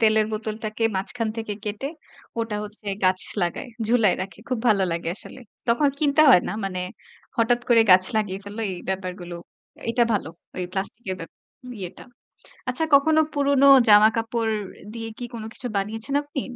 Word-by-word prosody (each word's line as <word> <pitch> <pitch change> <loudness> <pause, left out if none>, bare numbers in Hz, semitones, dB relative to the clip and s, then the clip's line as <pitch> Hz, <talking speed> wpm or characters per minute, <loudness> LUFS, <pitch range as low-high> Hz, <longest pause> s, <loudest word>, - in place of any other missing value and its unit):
তেলের 215 -1 +4
বোতলটাকে 215 +1 -3
মাঝখান 225 +4 -1
থেকে 225 -2 -4
কেটে 215 +7 -3 0.5
ওটা 225 -2 -2
হচ্ছে, 210 0 -11 0.2
গাছ 185 0 +4 0.2
লাগায়, 175 +9 -2 0.2
ঝুলায় 225 -4 +4
রাখে 195 - -9
খুব 255 -3 -1
ভালো 205 -3 +4
লাগে 170 0 -3
আসলে। 260 - -7 0.3
তখন 280 +5 +3
কিনতে 290 0 +3
হয় 180 - +7
না - - -2
মানে 185 -2 -3 0.6
হঠাৎ 240 +1 +2
করে 235 -2 +6
গাছ 185 0 +8
লাগিয়ে 200 -3 -1
ফেলল 205 +2 -9
এই 175 - -7
ব্যাপারগুলো। 185 -2 -4 0.5
এটা 240 +1 +2
ভালো 205 -6 -1 0.3
এই 180 - -2
প্লাস্টিক 200 +4 -4
এর 185 - -2
ব্যাপার 165 - -10 0.4
ইয়েটা। 180 -1 -7 0.6
আচ্ছা, 255 +6 0
কখনো 315 +3 +5
পুরনো 280 -1 +3 0.2
জামা 210 +1 +8
কাপড় 225 -1 -1 0.4
দিয়ে 225 -1 -5
কি 245 - -5
কোন 230 - -6
কিছু 250 - -7
বানিয়েছেন 220 +7 -2
আপনি? 290 -2 -5
220 Hz, 165 wpm, -24 LUFS, 195-245 Hz, 0.6 s, গাছ